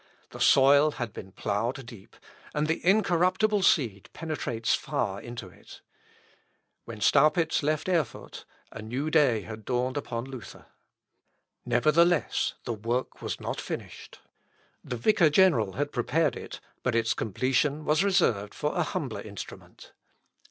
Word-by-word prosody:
The - - -10
soil 140 +2 +5
had 120 -4 -5
been 95 - -9
ploughed 115 +7 -2
deep, 115 -5 -13 0.4
and 150 0 +1
the 160 +1 -2
incorruptible 195 +2 +3
seed 115 - +1
penetrates 130 -8 -2
far - - -2
into 120 -4 -8
it. 90 - -15 1.0
When 115 -2 -9
Staupitz 155 +5 +3
left 155 +2 -1
Erfurt, 165 -9 -2 0.3
a 110 - -8
new 130 +8 -3
day 135 -9 +3
had 110 +1 -9
dawned 125 +3 -1
upon 120 -4 -4
Luther. 130 -3 -10
Seckendorf, - - -42
p. - - -9 0.2
52. 155 - +6
Nevertheless, 170 0 +2
the 120 - -3
work 115 +4 -3
was - - -4
not - - -4
finished. - - -8 0.6
The 125 - -5
vicar 165 - +4
general 150 - +3
had 145 +1 -2
prepared 140 +3 0
it, - - -8 0.2
but 125 - -1
its 115 -1 +2
completion 135 +7 0
was 155 +4 +3
reserved 145 - +1
for - - -2
a - - +1
humbler - - -3
instrument. - - -10
135 Hz, 145 wpm, -27 LUFS, 115-155 Hz, 1.0 s, 52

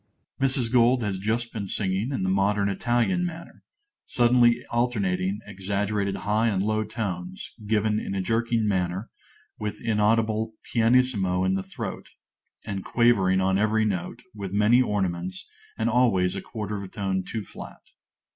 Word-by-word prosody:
_ - - +2
(_Mrs. 130 -3 +1
Gold 125 0 +4
has 95 -3 -2
just 115 +4 -2
been 100 -3 -4
singing 100 +5 -1
in 115 -9 -2
the - - 0
modern 100 +1 +2
Italian 120 - +1
manner; 170 -1 -7 0.5
suddenly 120 0 +3
alternating 100 -5 0
exaggerated 100 0 -2
high 105 +2 +2
and 100 -4 +1
low 110 +1 +1
tones, 95 -5 -5
given 105 0 +1
in 100 - -4
a 95 - 0
jerking 115 +1 +1
manner, 95 +1 -1 0.5
with 105 -1 -4
inaudible 110 0 +1
pianissimo 115 -6 +2
in 95 0 +2
the 95 - 0
throat, 95 0 -6 0.6
and 100 -3 -4
quavering 100 -6 +3
on 95 +1 +2
every 110 +1 +2
note, 95 -5 -3
with 100 -3 -6
many 105 +5 +5
ornaments, 95 -5 -2 0.3
and 110 - 0
always 110 -7 +2
a - - -3
quarter 105 -2 -5
of 100 - -5
a - - -6
tone 95 -1 -2
too 110 +3 -4
flat. - - -12
105 Hz, 155 wpm, -26 LUFS, 95-115 Hz, 0.6 s, many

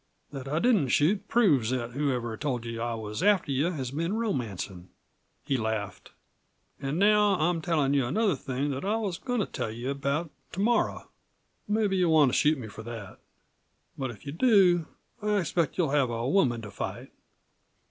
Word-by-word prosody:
That 135 -2 -7
I 150 +3 -1
didn't 205 - +3
shoot 160 - +2
proves 150 - +3
that 125 -2 -2
whoever 125 -4 -1
told 125 -3 -3
you 115 0 -5
I 120 0 -1
was 105 +2 -5
after 195 -6 +3
you 135 +3 +1
has 135 -8 -4
been 165 +6 -2
romancin'." 110 - -3 0.6
He 135 - +1
laughed. 110 -3 -4 0.7
"An' 140 +2 -2
now 210 +1 +4
I'm 165 +1 +1
tellin' 155 -5 +1
you 135 -4 +2
another 200 - +1
thing 135 +2 -3
that 135 0 -4
I 205 +3 +1
was 200 -6 -2
goin' 245 -3 -1
to - - 0
tell - - -4
you 120 +5 -4
about 140 +3 -2 0.2
to 180 - -5
morrow. 235 +4 +1 0.6
Mebbe 210 -1 +1
you'll 180 -4 +3
want 150 -5 +5
to - - 0
shoot 150 +1 +3
me 120 -4 -7
for 110 - -9
that. 115 -4 -8 0.8
But 135 -2 -3
if 120 +2 -11
you 140 - -4
do 180 - +4 0.3
I 210 0 +1
expect 170 -4 0
you'll 165 -7 +1
have 140 -4 +2
a 115 +1 -2
woman 125 -8 +2
to 105 - -8
fight. - - -6
145 Hz, 185 wpm, -28 LUFS, 120-185 Hz, 0.8 s, want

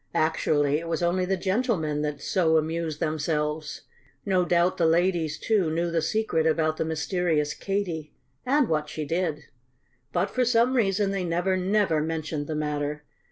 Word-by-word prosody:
Actually 150 -2 +2
it 165 - -7
was 165 +1 -1
only 180 +2 +1
the 190 +1 0
gentlemen 185 - 0
that 150 -1 -3
so 160 -4 +2
amused 160 0 -2
themselves. 155 0 -2 0.4
No 185 -2 +2
doubt 175 +1 +2
the 165 - +3
ladies, 165 -2 +1
too, 205 -7 +1
knew 170 +2 -1
the 165 -1 +1
secret 165 -4 0
about 155 0 +1
the - - -1
mysterious 160 -1 0
Katy 180 -6 -3 0.3
and 275 0 +2
what 150 -1 -1
she 155 0 -4
did. 160 -1 -1 0.7
But 180 +3 0
for 255 - +1
some 240 +1 +3
reason 200 -3 +2
they 195 -2 -2
never, 175 +2 0
never 185 -4 +1
mentioned 155 -2 -3
the 155 - -3
matter. 150 0 -2
165 Hz, 160 wpm, -26 LUFS, 155-185 Hz, 0.7 s, the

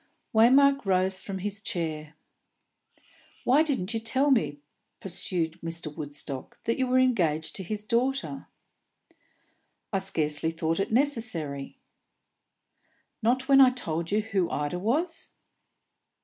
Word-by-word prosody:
Waymark 275 +5 +5
rose 190 -1 +1
from 195 -1 -6
his 200 +1 -3
chair. 155 -7 -3 1.3
"Why 270 +5 +5
didn't 260 -10 -1
you 225 - -1
tell 260 +6 +1
me," 150 - +2 0.4
pursued 170 -3 -2
Mr. 165 -2 -4
Woodstock, 145 -2 -6
"that 230 - -1
you 260 - +1
were 255 +1 +2
engaged 170 -12 +2
to 190 - -5
his 210 +3 -4
daughter?" 270 +4 -1 1.5
"I 195 - +2
scarcely 160 -5 0
thought 165 +1 -1
it 195 - -1
necessary." 220 - -1 1.4
"Not 255 +4 +1
when 275 -1 +7
I 260 - +8
told 170 -10 -3
you 210 +2 +2
who 200 -5 -1
Ida 150 +4 -2
was?" 310 - -2
195 Hz, 120 wpm, -27 LUFS, 165-255 Hz, 1.5 s, I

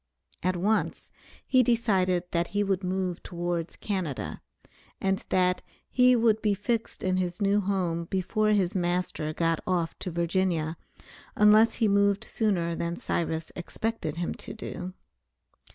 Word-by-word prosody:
At 185 +1 +1
once, 205 +5 0 0.3
he 255 - +4
decided 195 -7 +2
that 170 0 +1
he 205 - +3
would 195 -1 0
move 185 -1 -2
towards 175 -1 -3
Canada, 185 -10 -3 0.6
and 195 0 0
that 180 0 +2 0.3
he 250 0 +5
would 225 -2 +3
be 210 -2 +2
fixed 225 +3 -2
in 185 0 +1
his 180 -1 -2
new 200 0 +3
home 180 -4 -1
before 195 +4 0
his 195 -4 +2
master 175 -4 -1
got 165 0 0
off 175 -3 0
to 185 - -4
Virginia, 170 -2 0 0.6
unless 210 +2 +6
he 225 - +2
moved 200 +1 +3
sooner 190 -8 0
than 170 +1 -2
Cyrus 160 -2 -2
expected 175 -3 -3
him 175 - -2
to - - -8
do. 185 -4 -6
185 Hz, 140 wpm, -28 LUFS, 175-210 Hz, 0.6 s, unless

